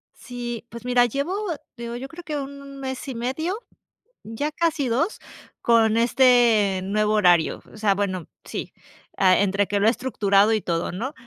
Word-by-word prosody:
Sí, 240 -2 -6
pues, 235 +1 -10
mira, 245 -1 +4
llevo 280 - -2 0.4
digo 235 0 -6
yo 255 +3 -6
creo 330 +5 -11
que 300 -3 -4
1 275 0 -8
mes 265 +1 -5
y 265 - -5
medio, 270 - -2 0.7
ya 225 +8 -3
casi 315 -4 0
2, 295 - 0 0.4
con 225 -1 +4
este 235 -5 +4
nuevo 210 +2 +1
horario, 175 -6 +3
o - - -13
sea, 210 -2 +2
bueno, 185 -5 -2 0.2
sí, - - -6 0.4
ah, 185 -1 +5
entre 200 0 +1
que 205 - 0
lo 205 - +3
he - - +8
estructurado 215 -4 +2
y 215 - +1
todo, 170 -1 -2
¿no?, 235 +11 -4
235 Hz, 170 wpm, -23 LUFS, 205-270 Hz, 0.7 s, he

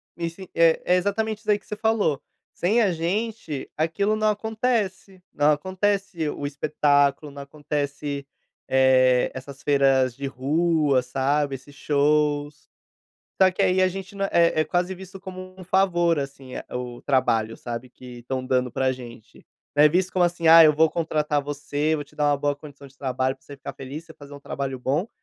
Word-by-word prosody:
me 170 -1 -3
sen 185 +3 -11
eh, 165 -1 +4
é 180 - +4
exatamente 210 +3 -1
isso 220 - -24
daí 210 -1 +3
que - - -29
você 210 - -4
falou: 215 -9 +1 0.3
Sem 210 +7 +2
a 205 -4 +3
gente, 175 -2 -3
aquilo 200 +7 0
não 215 0 +2
acontece, 210 -3 -2
não 145 +1 +3
acontece 185 +1 -1
o - - -6
o 145 - -2
espetáculo, 145 0 +1
não 140 0 -9
acontece, 145 0 -4 0.4
eh, 130 -1 +4
essas 135 +1 -9
feiras 135 -3 +3
de 140 +1 -4
rua, 145 +1 +1
sabe, 135 +3 0
esses 140 +2 -13
shows. 145 0 0 0.7
Só 190 0 +7
que 185 - -1
aí 185 +1 +3
a 185 - +4
gente 190 +1 -7
não 195 0 -1
é - - -9 0.3
é - - +5
é - - +2
quase 180 +4 -1
visto 190 +1 -11
como 185 -1 -9
um 185 - -9
favor, 175 -3 +2
assim, 135 -2 -8
eh, - - -6
o 125 -1 -5
trabalho, 115 -5 +1
sabe, 120 +1 -6
que 125 -1 -12
estão 130 +2 -4
dando 125 -1 +1
pra 130 +2 0
gente. 120 -3 -12 0.3
É 150 +1 +6
visto 180 +4 0
como 180 -1 +3
assim: 175 -1 -1
"Ah, 165 +1 +10
eu 155 -1 +7
vou 160 +2 +4
contratar 150 -3 -1
você, 145 +2 -2
vou 145 - -5
te 140 - -23
dar 150 - 0
uma 145 - +2
boa 145 +1 0
condição 145 -1 -13
de 135 0 -19
trabalho 130 -1 -1
pra 135 - -30
você 140 - -11
ficar 135 - -7
feliz, 140 +4 -8
você 165 - -13
fazer 145 0 -12
um 140 - -10
trabalho 135 -2 -4
bom 145 - -1
150 Hz, 195 wpm, -24 LUFS, 140-185 Hz, 0.7 s, Ah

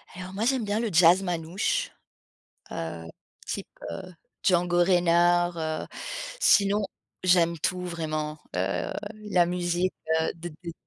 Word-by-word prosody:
Alors 185 +1 -7
moi 215 +4 -1
j'aime 255 -2 +2
bien 205 +2 0
le 230 -2 0
jazz 175 +3 +6
manouche, 175 +1 -1 0.8
heu, 80 0 -5 0.4
type, - - -4 0.2
heu, 185 -1 -7 0.3
Django 175 -1 +3
Reinhardt, 175 -1 +3
heu, 155 -1 -2 0.5
sinon, 205 +1 +4 0.4
j'aime 170 -2 +4
tout 180 +4 -1
vraiment, 155 -3 -3 0.2
heu, 90 0 -1 0.4
la 175 -2 +4
musique, 175 +1 0 0.3
heu, 160 - 0
de 170 +1 -7 0.2
d 170 - -4
175 Hz, 125 wpm, -27 LUFS, 165-185 Hz, 0.8 s, jazz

